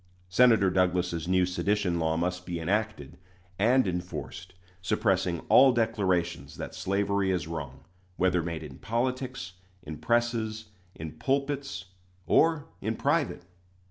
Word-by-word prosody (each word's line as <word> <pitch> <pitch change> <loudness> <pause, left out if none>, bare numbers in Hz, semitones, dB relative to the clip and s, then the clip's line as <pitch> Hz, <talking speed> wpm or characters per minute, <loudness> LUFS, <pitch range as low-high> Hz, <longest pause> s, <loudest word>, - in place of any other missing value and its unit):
Senator 110 -2 +5
Douglas's 90 -2 +1
new 90 0 +3
sedition 90 -1 0
law 80 0 0
must 90 +2 -1
be 90 -2 -4
enacted 105 +6 -2 0.4
and 120 +2 +4
enforced, 90 0 -5 0.3
suppressing 95 -3 +1
all 135 0 +6
declarations 95 - 0
that - - -6
slavery 100 +1 0
is 90 -4 0
wrong, 70 -5 -6 0.4
whether 90 -1 +2
made 85 -1 -4
in 65 -4 -10
politics, 125 -5 -2 0.3
in 75 -1 -7
presses, 115 -2 0 0.3
in 80 -1 -8
pulpits, 140 -8 -1 0.4
or 160 -2 +3 0.2
in 110 +1 -1
private. - - 0
95 Hz, 120 wpm, -28 LUFS, 85-110 Hz, 0.4 s, all